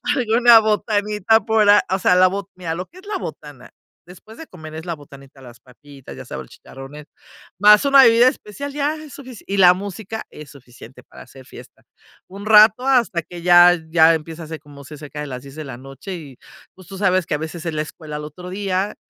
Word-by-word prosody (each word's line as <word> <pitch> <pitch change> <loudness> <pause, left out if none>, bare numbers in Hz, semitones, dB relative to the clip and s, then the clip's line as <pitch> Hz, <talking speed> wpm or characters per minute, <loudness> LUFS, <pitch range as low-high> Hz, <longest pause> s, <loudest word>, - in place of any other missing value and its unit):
alguna 235 -2 +5
botanita 210 0 0
por 220 -1 +1
a 205 0 +6
o 190 +1 -1
sea, 180 - +2
la 185 0 +5
bo 195 +1 -5
mira 175 -3 -5
lo 180 +3 -6
que 360 - -18
es 390 - -18
la 410 -2 -4
botana 145 - -10 0.4
después 200 +5 -15
de 325 - -11
comer 160 -3 -12
es 160 +1 -8
la 170 - -4
botanita, 140 -2 -17
las 120 -2 -15
papitas, 135 +1 -15
ya - - -10
sabe, - - -8
el - - -18
chicharrones 145 +3 -13 0.5
más 210 +1 +6
una 275 -1 +6
bebida 230 +1 +5
especial 275 +5 -9
ya 295 +1 -2
es 310 -2 -12
sufici 255 -5 -12
y 200 - -3
la 180 -2 +7
música 205 +3 -7
es 150 -2 -13
suficiente 125 -2 -16
para - - -15
hacer 130 -1 -17
fiesta. - - -15 0.4
Un 200 +2 -11
rato 220 +4 +5
hasta 235 -10 +1
que 175 +2 -12
ya 175 0 +6
ya 165 0 +5
empieza 160 +1 -8
a - - -10
ser 160 0 -8
como 145 -1 -15
ce 150 +3 -11
cerca 150 0 -10
de 150 - -6
las 125 -2 -7
10 140 +1 -13
de 155 - -8
la 135 -3 -8
noche, 135 +8 -10
y 145 -7 -12 0.4
pues 185 -2 -17
tú 195 - -10
sabes 185 -2 +1
que - - -4
a - - -2
veces 160 +2 -8
es 165 - -3
la 155 - -2
escuela 155 0 -9
al 150 - -7
otro 180 +4 -11
día, 195 +1 -3
180 Hz, 225 wpm, -19 LUFS, 150-210 Hz, 0.5 s, la